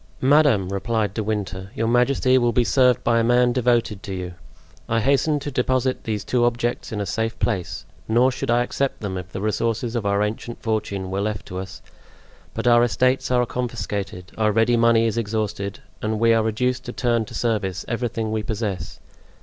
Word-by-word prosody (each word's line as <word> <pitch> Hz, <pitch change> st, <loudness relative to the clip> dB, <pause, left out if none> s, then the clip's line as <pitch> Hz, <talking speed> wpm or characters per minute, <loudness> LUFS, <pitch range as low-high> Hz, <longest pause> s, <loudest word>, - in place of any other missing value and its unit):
"Madame," 135 Hz, -9 st, +4 dB
replied 105 Hz, 0 st, -1 dB
De 110 Hz, -, -2 dB
Winter, 100 Hz, -3 st, -3 dB
"your 115 Hz, -, 0 dB
majesty 130 Hz, +2 st, +3 dB
will 120 Hz, -2 st, +3 dB
be 125 Hz, -, +2 dB
served 125 Hz, 0 st, +3 dB
by 115 Hz, -1 st, +3 dB
a -, -, +2 dB
man 120 Hz, +1 st, +3 dB
devoted 120 Hz, -5 st, +1 dB
to 95 Hz, -, -5 dB
you. 90 Hz, -1 st, -5 dB, 0.6 s
I 115 Hz, -, +2 dB
hasten 140 Hz, +5 st, +2 dB
to 145 Hz, -, -4 dB
deposit 130 Hz, 0 st, 0 dB
these 105 Hz, -2 st, -2 dB
two 125 Hz, -1 st, +1 dB
objects 120 Hz, 0 st, -1 dB
in 105 Hz, -, -3 dB
a 100 Hz, -, -1 dB
safe 115 Hz, +4 st, -2 dB
place, 95 Hz, -7 st, -2 dB, 0.2 s
nor 120 Hz, +4 st, +4 dB
should 135 Hz, 0 st, -4 dB
I 120 Hz, +1 st, +3 dB
accept 135 Hz, +2 st, -2 dB
them 100 Hz, -3 st, -3 dB
if 90 Hz, -1 st, -6 dB
the 95 Hz, -, -5 dB
resources 115 Hz, +3 st, -1 dB
of 110 Hz, -4 st, -1 dB
our 100 Hz, +1 st, +2 dB
ancient 110 Hz, +2 st, -4 dB
fortune 105 Hz, -4 st, -2 dB
were 95 Hz, +1 st, -1 dB
left 105 Hz, -1 st, -3 dB
to 90 Hz, -, -4 dB
us, 95 Hz, 0 st, -8 dB, 0.7 s
but -, -, -3 dB
our 120 Hz, -1 st, +6 dB
estates 130 Hz, +2 st, +1 dB
are 125 Hz, -1 st, +3 dB
confiscated, 100 Hz, -6 st, -4 dB
our 105 Hz, -1 st, +3 dB
ready 115 Hz, +3 st, +3 dB
money 115 Hz, -1 st, +4 dB
is 115 Hz, +1 st, 0 dB
exhausted, 105 Hz, -2 st, -3 dB, 0.2 s
and 110 Hz, 0 st, -1 dB
we 115 Hz, 0 st, +4 dB
are 115 Hz, -, +3 dB
reduced 125 Hz, +3 st, -1 dB
to 120 Hz, -, -5 dB
turn 120 Hz, -2 st, +1 dB
to -, -, -10 dB
service 105 Hz, -6 st, -1 dB
everything 115 Hz, -2 st, -2 dB
we 110 Hz, 0 st, -1 dB
possess. 105 Hz, -3 st, -4 dB
115 Hz, 195 wpm, -23 LUFS, 105-120 Hz, 0.7 s, our